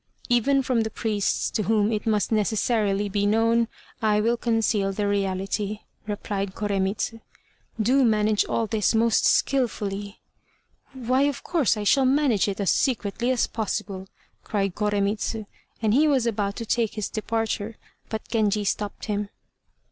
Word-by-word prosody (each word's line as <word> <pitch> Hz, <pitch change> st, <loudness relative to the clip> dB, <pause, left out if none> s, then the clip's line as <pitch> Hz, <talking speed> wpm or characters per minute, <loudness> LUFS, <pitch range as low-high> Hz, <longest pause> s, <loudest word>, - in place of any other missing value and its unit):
"Even 270 Hz, +3 st, +3 dB
from 250 Hz, -3 st, +1 dB
the 220 Hz, -, -1 dB
priests 215 Hz, -3 st, -1 dB
to 220 Hz, -, 0 dB
whom 215 Hz, 0 st, +2 dB
it 215 Hz, 0 st, -2 dB
must 210 Hz, -1 st, +1 dB
necessarily 210 Hz, -1 st, +1 dB
be 205 Hz, 0 st, 0 dB
known, 230 Hz, +2 st, +3 dB, 0.3 s
I 210 Hz, -1 st, +3 dB
will 230 Hz, +3 st, +2 dB
conceal 225 Hz, -4 st, +1 dB
the 205 Hz, +1 st, -1 dB
reality," 200 Hz, +1 st, -1 dB, 0.3 s
replied 200 Hz, -2 st, -3 dB
Koremitz. 200 Hz, +1 st, -1 dB, 0.7 s
"Do 255 Hz, +5 st, +3 dB
manage 215 Hz, -2 st, +3 dB
all 230 Hz, -, 0 dB
this 220 Hz, 0 st, +1 dB
most 230 Hz, 0 st, +3 dB
skilfully!" 205 Hz, -6 st, 0 dB, 0.7 s
"Why, 255 Hz, 0 st, 0 dB
of 280 Hz, -, -6 dB
course 305 Hz, -10 st, +1 dB
I 210 Hz, -, -3 dB
shall 265 Hz, +6 st, +4 dB
manage 260 Hz, -7 st, +3 dB
it 200 Hz, 0 st, -3 dB
as 200 Hz, -, +2 dB
secretly 240 Hz, -1 st, 0 dB
as 255 Hz, -2 st, +2 dB
possible," 195 Hz, -3 st, -4 dB, 0.4 s
cried 195 Hz, -3 st, -1 dB
Koremitz; 205 Hz, +1 st, 0 dB, 0.5 s
and 215 Hz, -1 st, +3 dB
he 300 Hz, +5 st, +4 dB
was 270 Hz, -5 st, +2 dB
about 205 Hz, -3 st, -1 dB
to 230 Hz, -, -5 dB
take 225 Hz, -1 st, 0 dB
his 215 Hz, -2 st, -2 dB
departure, 225 Hz, -1 st, -2 dB, 0.3 s
but 220 Hz, -1 st, -5 dB
Genji 210 Hz, -2 st, +1 dB
stopped 205 Hz, +1 st, -3 dB
him. 205 Hz, -1 st, -2 dB
215 Hz, 150 wpm, -25 LUFS, 205-230 Hz, 0.7 s, shall